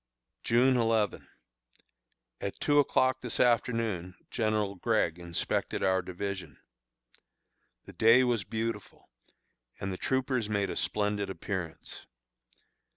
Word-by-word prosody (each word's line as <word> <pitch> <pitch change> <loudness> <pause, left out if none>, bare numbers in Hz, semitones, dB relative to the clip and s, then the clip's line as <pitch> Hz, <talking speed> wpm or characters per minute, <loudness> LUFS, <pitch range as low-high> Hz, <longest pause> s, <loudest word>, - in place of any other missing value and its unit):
June 125 +2 +4
11. 115 -3 +1 1.1
At 100 - -5
two 145 -1 +3
o'clock 130 -2 +2
this 125 - -4
afternoon 115 -7 +1 0.2
General 110 -3 0
Gregg 95 -4 0
inspected 85 -1 -2
our 95 -1 +3
division. 95 +2 -5 1.3
The - - -11
day 115 +3 +6
was 120 -5 +1
beautiful, 110 - -5 0.7
and 95 -1 -3
the - - -5
troopers 130 -3 -1
made 100 -2 0
a - - -4
splendid 105 -1 -1
appearance. 95 -4 -6
105 Hz, 105 wpm, -30 LUFS, 95-120 Hz, 1.3 s, day